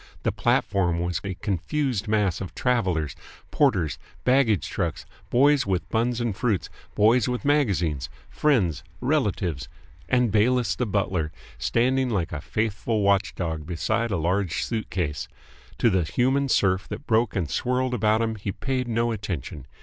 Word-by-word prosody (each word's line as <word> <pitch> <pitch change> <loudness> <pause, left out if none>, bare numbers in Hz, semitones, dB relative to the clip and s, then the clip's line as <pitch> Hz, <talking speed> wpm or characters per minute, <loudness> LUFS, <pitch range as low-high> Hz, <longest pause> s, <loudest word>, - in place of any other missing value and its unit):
The - - +1
platform 90 -3 +1
was 85 -1 -2
a 100 -2 -4
confused 110 - -1
mass 105 -5 +1
of 95 - -6
travellers, 90 - 0 0.4
porters, 95 - +2 0.2
baggage, 115 - +3
trucks, - - -3 0.2
boys 140 0 +4
with 95 -2 -1
buns 120 +2 0
and 120 -4 -1
fruits, 110 -4 -1 0.2
boys 110 +3 +4
with 125 +3 -3
magazines, 95 - +1 0.2
friends, 100 - +1 0.2
relatives, 100 - -1 0.4
and 125 -1 +3
Bayliss 110 -3 +2
the 120 - -1
butler, 95 -6 -1 0.3
standing 130 +2 +1
like 95 -6 -1
a 75 -3 -4
faithful 110 +1 -1
watchdog 90 -6 0
beside 110 +7 -1
a 95 - 0
large 90 +1 0
suitcase. 90 -9 -3 0.5
To 115 - +3
the 95 -1 +2
human 130 - +1
surf 95 -4 +2
that 145 - -7
broke 110 0 +2
and 90 -5 0
swirled 125 - 0
about 110 -1 +2
him 110 0 -1
he 100 0 -3
paid 130 +4 -2
no 115 0 +1
attention. 85 - -5
105 Hz, 145 wpm, -25 LUFS, 90-125 Hz, 0.5 s, boys